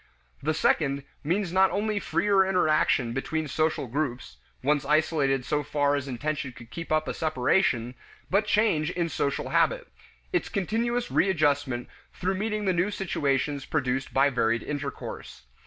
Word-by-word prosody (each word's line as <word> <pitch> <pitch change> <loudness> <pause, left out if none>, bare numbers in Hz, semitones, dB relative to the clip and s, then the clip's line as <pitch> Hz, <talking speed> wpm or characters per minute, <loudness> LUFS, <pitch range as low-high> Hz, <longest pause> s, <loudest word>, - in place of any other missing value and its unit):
The 155 +2 0
second 140 -3 +1 0.2
means 175 +3 -1
not 190 0 +5
only 210 +1 -1
freer 190 +2 +2
interaction 155 -9 +2
between 155 +4 -2
social 155 +1 0
groups 130 0 -3 0.3
(once 145 +1 +2
isolated 145 -3 +1
so 150 +2 0
far 145 0 +1
as 140 -1 -3
intention 140 +1 -3
could 120 0 -14
keep 165 +2 -7
up 155 0 +2
a - - -2
separation) 125 -5 +1 0.3
but 205 +3 +1
change 205 -8 +2
in 170 -2 -1
social 140 -2 -1
habit - - +2 0.5
its 355 - 0
continuous 235 +5 -1
readjustment 145 -8 +1 0.3
through 185 +2 -1
meeting 210 +2 -2
the 190 - +2
new 180 +4 +1
situations 145 -7 -1
produced 130 +1 -1
by 140 +1 +3
varied 115 -2 +1
intercourse. 140 - -6
155 Hz, 145 wpm, -27 LUFS, 135-190 Hz, 0.5 s, not